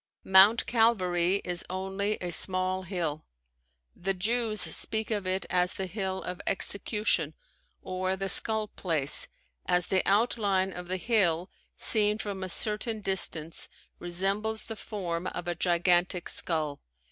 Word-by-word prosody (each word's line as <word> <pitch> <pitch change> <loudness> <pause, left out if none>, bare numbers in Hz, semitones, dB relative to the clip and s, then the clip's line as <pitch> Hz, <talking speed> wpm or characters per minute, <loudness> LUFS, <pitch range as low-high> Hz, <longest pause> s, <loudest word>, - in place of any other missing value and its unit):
Mount 195 +4 +5
Calvary 195 -5 +1
is 175 -1 -2
only 195 +3 -3
a 175 -1 -4
small 185 +2 +3
hill. 170 -5 -4 0.7
The 195 +2 -2
Jews 220 +3 +1
speak 220 0 0
of 205 -3 -2
it 190 +1 -1
as 180 0 +3
the 190 - -3
Hill 190 0 -4
of 180 0 -6
Execution, 200 -5 +1 0.5
or 185 0 -2
the 195 +1 -4
Skull 220 +1 +3
Place, 155 -9 +1 0.4
as 180 0 +2
the 190 -1 +3
outline 200 -3 +1
of 180 0 -8
the 185 +1 -2
hill 185 -5 +1 0.3
seen 210 -1 +2
from 200 -3 -5
a 185 - -4
certain 215 +3 -2
direction 170 -5 +1 0.5
resembles 195 +5 0
the 225 - -7
form 180 -5 -5
of 175 - -6
a 175 - -1
gigantic 175 +1 +1
skull. 155 -4 -1
190 Hz, 135 wpm, -28 LUFS, 175-210 Hz, 0.7 s, Mount